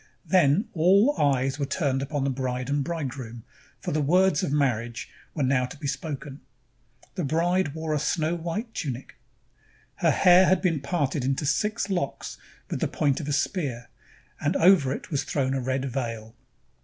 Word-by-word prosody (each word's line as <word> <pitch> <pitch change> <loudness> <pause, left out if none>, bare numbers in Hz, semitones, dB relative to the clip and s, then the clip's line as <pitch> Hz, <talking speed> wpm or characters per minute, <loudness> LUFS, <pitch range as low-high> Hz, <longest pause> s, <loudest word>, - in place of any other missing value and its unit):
Then 185 - +3
all 195 - +4
eyes 135 -1 +1
were 140 - -1
turned 140 -2 0
upon 140 0 -2
the 140 - 0
bride 130 0 -3
and 145 0 +1
bridegroom, 130 -7 -5 0.4
for - - -4
the 155 - 0
words 180 +2 +3
of - - -2
marriage 120 -5 -1 0.3
were 150 - 0
now 130 -1 +2
to 125 - -11
be 150 - -8
spoken. 140 -1 -5 0.7
The 180 - -3
bride 165 +1 +1
wore 160 -1 -2
a 150 - +1
snow 155 +2 0
white 175 +8 -4
tunic. 135 -4 -5 0.8
Her - - +2
hair 180 +1 +6
had 190 - +4
been 170 -5 0
parted 140 -2 -1
into 135 +3 -1
six 210 +10 0
locks 175 -8 -3 0.3
with - - -3
the - - 0
point 140 -3 0
of 150 - -6
a - - -1
spear, 140 - -2 0.5
and 150 +5 0
over 165 -7 +5
it 140 - -6
was 145 - 0
thrown 135 -2 -1
a 135 - -1
red 130 +1 -1
veil. 115 -4 -4
145 Hz, 175 wpm, -26 LUFS, 135-170 Hz, 0.8 s, hair